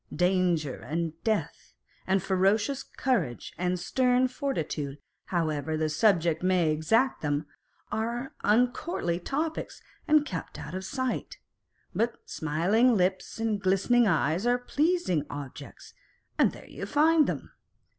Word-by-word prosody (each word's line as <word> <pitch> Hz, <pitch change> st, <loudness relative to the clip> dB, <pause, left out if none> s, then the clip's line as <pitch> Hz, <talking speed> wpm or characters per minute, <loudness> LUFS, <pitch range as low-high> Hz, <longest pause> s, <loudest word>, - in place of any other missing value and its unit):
Danger 180 Hz, -5 st, +1 dB
and 165 Hz, 0 st, -3 dB
death, 220 Hz, -2 st, -2 dB, 0.3 s
and 190 Hz, 0 st, +2 dB
ferocious 205 Hz, +8 st, +2 dB
courage 185 Hz, -, -2 dB
and 180 Hz, +1 st, -1 dB
stern 250 Hz, +6 st, +2 dB
fortitude, 160 Hz, -, -3 dB, 0.3 s
however 155 Hz, -3 st, -1 dB
the 155 Hz, 0 st, 0 dB
subject 170 Hz, -2 st, +2 dB
may 180 Hz, -3 st, +2 dB
exact 225 Hz, -, +2 dB
them, 145 Hz, 0 st, -1 dB, 0.5 s
are 235 Hz, +6 st, -2 dB
uucourtly 225 Hz, -, +1 dB
topics 310 Hz, -, -3 dB, 0.3 s
and 305 Hz, -1 st, +5 dB
kept 180 Hz, -, -6 dB
out 150 Hz, -, -8 dB
of 190 Hz, +1 st, -4 dB
sight: 260 Hz, +5 st, -3 dB, 0.6 s
but 230 Hz, +2 st, 0 dB
smiling 195 Hz, +11 st, +2 dB
lips 185 Hz, +1 st, 0 dB
and 220 Hz, -3 st, -1 dB
glistening 200 Hz, +5 st, +3 dB
eyes 170 Hz, +3 st, +1 dB
are 245 Hz, 0 st, +4 dB
pleasing 280 Hz, -, +1 dB
objects, 145 Hz, 0 st, -9 dB, 0.4 s
and -, -, +4 dB
there -, -, -12 dB
you -, -, -7 dB
find 310 Hz, +1 st, +4 dB
them. -, -, -4 dB
190 Hz, 125 wpm, -28 LUFS, 165-245 Hz, 0.6 s, and